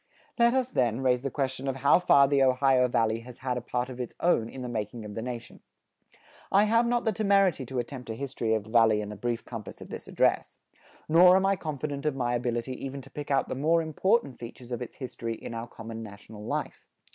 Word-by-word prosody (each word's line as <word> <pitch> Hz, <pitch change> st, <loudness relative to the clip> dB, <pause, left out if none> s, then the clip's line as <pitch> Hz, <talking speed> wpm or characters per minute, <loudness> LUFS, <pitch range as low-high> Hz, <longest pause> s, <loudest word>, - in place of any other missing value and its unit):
Let 235 Hz, +1 st, +5 dB
us, 260 Hz, -1 st, 0 dB
then, 120 Hz, -1 st, +1 dB
raise 125 Hz, -2 st, +2 dB
the 135 Hz, -, -2 dB
question 135 Hz, 0 st, -3 dB
of 135 Hz, -, -1 dB
how 140 Hz, +5 st, +4 dB
far 140 Hz, -6 st, +5 dB
the 140 Hz, 0 st, +2 dB
Ohio 130 Hz, -1 st, +4 dB
Valley 115 Hz, -2 st, +1 dB
has 120 Hz, +1 st, -12 dB
had 125 Hz, -1 st, -2 dB
a 125 Hz, -, -3 dB
part 125 Hz, +1 st, -2 dB
of 130 Hz, -1 st, -9 dB
its 125 Hz, -2 st, -5 dB
own 115 Hz, -10 st, +2 dB
in 130 Hz, +1 st, -8 dB
the -, -, -4 dB
making 110 Hz, -1 st, -4 dB
of 105 Hz, -, -7 dB
the 110 Hz, -, -4 dB
nation. 120 Hz, -1 st, -7 dB, 0.9 s
I 200 Hz, +2 st, +5 dB
have 230 Hz, +2 st, +3 dB
not 240 Hz, 0 st, 0 dB
the 220 Hz, -, +3 dB
temerity 195 Hz, -, +2 dB
to 130 Hz, -, -5 dB
attempt 125 Hz, 0 st, -5 dB
a 110 Hz, -, -3 dB
history 120 Hz, -3 st, -1 dB
of 110 Hz, -, -2 dB
the 110 Hz, -, -13 dB
Valley 110 Hz, -2 st, +4 dB
in 105 Hz, -, -6 dB
the 105 Hz, -, -6 dB
brief 120 Hz, +2 st, -3 dB
compass 115 Hz, -4 st, -8 dB
of -, -, -11 dB
this -, -, -8 dB
address. -, -, +1 dB, 0.5 s
Nor 180 Hz, +3 st, +7 dB
am 190 Hz, 0 st, +3 dB
I 195 Hz, 0 st, +3 dB
confident 150 Hz, -3 st, -4 dB
of 150 Hz, -, 0 dB
my 120 Hz, -2 st, -1 dB
ability 120 Hz, +1 st, -2 dB
even 135 Hz, 0 st, -5 dB
to 135 Hz, -, -15 dB
pick 145 Hz, -1 st, -7 dB
out 135 Hz, -1 st, +2 dB
the -, -, -3 dB
more 155 Hz, +5 st, +2 dB
important 190 Hz, -, 0 dB
features 120 Hz, +1 st, -10 dB
of 120 Hz, -, -3 dB
its 125 Hz, -, -7 dB
history 120 Hz, -3 st, -5 dB
in 115 Hz, -, -8 dB
our 115 Hz, +1 st, -5 dB
common 115 Hz, -1 st, -8 dB
national 105 Hz, 0 st, -10 dB
life. -, -, -4 dB
130 Hz, 235 wpm, -28 LUFS, 115-145 Hz, 0.9 s, Nor